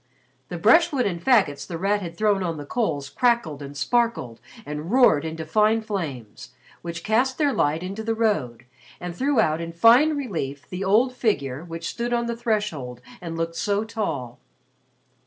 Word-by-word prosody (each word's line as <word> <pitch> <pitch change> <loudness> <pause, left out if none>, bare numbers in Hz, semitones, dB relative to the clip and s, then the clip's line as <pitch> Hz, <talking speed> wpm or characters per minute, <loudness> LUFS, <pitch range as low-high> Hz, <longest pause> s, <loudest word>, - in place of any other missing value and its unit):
The 175 - -4
brushwood 270 - +4
and 170 -4 -3
faggots 200 - +2
The 170 - -5
Rat 200 +4 0
had 170 -2 -7
thrown 210 -2 +2
on 170 -3 -2
the 145 - -7
coals 150 - -2
crackled 235 - 0
and 140 0 -8
sparkled 230 - 0 0.2
and 150 +3 -5
roared 245 - +5
into 160 0 -5
fine 215 +6 +2
flames, 150 - -6 0.3
which 170 -1 -6
cast 250 +4 +1
their 290 -3 +2
light 155 -1 0
into 195 +4 -5
the 225 0 -1
road 155 - -1 0.3
and 175 -1 -6
threw 270 +3 +1
out 160 -5 +2
in 165 0 -5
fine 245 - +5
relief 160 - -4
the 185 +1 -5
old 225 +7 +3
figure 145 - -1
which 165 -1 -6
stood 240 +1 -3
on 235 0 +1
the 235 0 -2
threshold 210 - -2 0.2
and 165 -2 -6
looked 165 0 -2
so 205 +3 0
tall. 160 - -4
190 Hz, 175 wpm, -24 LUFS, 155-230 Hz, 0.3 s, roared